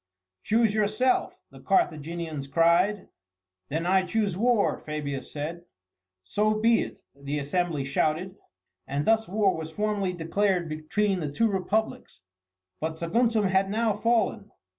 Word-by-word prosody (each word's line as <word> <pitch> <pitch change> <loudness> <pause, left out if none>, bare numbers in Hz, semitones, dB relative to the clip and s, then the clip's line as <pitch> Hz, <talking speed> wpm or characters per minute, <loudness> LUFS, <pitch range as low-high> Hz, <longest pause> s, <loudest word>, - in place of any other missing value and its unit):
"Choose 225 - +2
yourself," 215 +4 +1
the - - -13
Carthaginians 160 - -1
cried. 170 +6 +2 0.6
"Then 160 +3 -2
I 190 +1 +4
choose 200 0 -1
war," 230 +1 +2
Fabius 145 -3 -5
said. 165 +4 -5 0.6
"So 210 - +1
be 225 +2 +3
it," - - -7
the 140 +1 -4
assembly 150 0 -1
shouted. 155 +7 -1 0.5
And 140 +1 -2
thus 225 0 +3
war 200 0 +2
was 160 0 -5
formally 205 +1 -1
declared 180 +1 0
between 185 +6 -1
the 150 -4 -3
two 225 +10 +2
Republics. 200 - -2 0.6
But 160 0 -3
Saguntum 225 +6 +1
had 190 +1 +2
now 220 +1 +1
fallen. 220 -1 0
185 Hz, 130 wpm, -27 LUFS, 160-215 Hz, 0.6 s, I